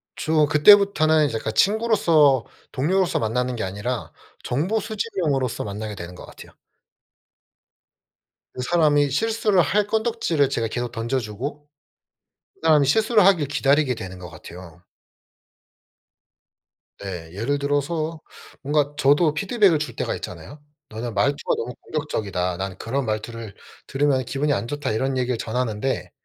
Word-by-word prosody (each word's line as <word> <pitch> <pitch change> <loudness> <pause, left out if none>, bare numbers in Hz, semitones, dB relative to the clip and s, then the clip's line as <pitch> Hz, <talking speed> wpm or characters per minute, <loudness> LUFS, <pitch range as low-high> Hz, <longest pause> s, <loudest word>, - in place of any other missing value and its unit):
주로 155 -1 +2
그때부터는 160 -1 +5
이제 140 - -2
그러니까 110 - -3
친구로서 165 - +3 0.3
동료로서 180 +7 +1
만나는 125 +3 -1
게 115 - -3
아니라 105 +6 -4 0.3
정보 175 - 0
수집 215 0 -4
용으로서 135 -7 0
만나게 105 +1 -5
되는 90 -1 -8
것 - - -11
같아요. - - -14 2.0
그 125 - -5
사람이 145 -1 +3
실수를 215 +2 +2
할 205 +6 +1
건덕지를 220 - 0
제가 115 -4 -1
계속 120 +1 -4
던져주고 125 +5 -4 0.9
그 - - -31
사람이 150 -4 +4
실수를 220 - +3
하길 175 -8 +4
기다리게 140 -1 +2
되는 95 -5 -8
것 90 -1 -9
같아요. 85 +1 -12 2.2
네. 90 -5 -7
예를 125 +9 -1
들어서 155 +3 -2 0.4
뭔가 145 0 0
저도 150 +2 +3
피드백을 195 0 +2
줄 155 - -5
때가 - - -2
있잖아요. 145 0 -9 0.3
"너는 115 +2 -5
말투가 140 +5 +1
너무 125 +2 -5
공격적이다. 100 - -3
나는 95 -1 -5
그런 130 +6 -2
말투를 110 -1 -5 0.3
들으면 135 -1 +1
기분이 145 +4 0
안 120 - -2
좋다." 145 0 -3
이런 130 +5 -1
얘기를 125 -2 -1
전하는데 120 +2 -2
140 Hz, 325 characters per minute, -23 LUFS, 115-155 Hz, 2.2 s, 그때부터는